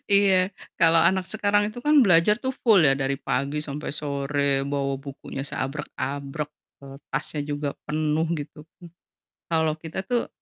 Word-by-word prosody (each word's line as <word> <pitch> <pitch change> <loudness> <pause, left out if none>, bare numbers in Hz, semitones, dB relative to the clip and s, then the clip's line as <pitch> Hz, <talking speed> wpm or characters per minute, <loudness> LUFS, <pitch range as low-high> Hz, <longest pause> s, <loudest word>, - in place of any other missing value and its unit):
Iya, 195 -2 +4 0.3
kalau 165 -1 +6
anak 185 +3 +3
sekarang 205 0 +1
itu 245 - -9
kan 300 -1 +6
belajar 175 +2 +5
tuh 260 - -1
full 215 -5 +6
ya 135 - +5
dari 135 0 0
pagi 140 +2 -1
sampai 150 0 -5
sore, 140 -1 0
bawa 140 -1 -1
bukunya 140 -1 -7
seabrek-abrek, 140 +1 -4 0.3
eee, 135 0 -10 0.2
tasnya 145 +2 -2
juga 145 0 -2 0.2
penuh 155 +1 +1
gitu, 150 +1 -10 0.9
kalau 160 -2 +2
kita 160 +3 -5
tuh 240 +3 0
150 Hz, 145 wpm, -25 LUFS, 140-185 Hz, 0.9 s, kalau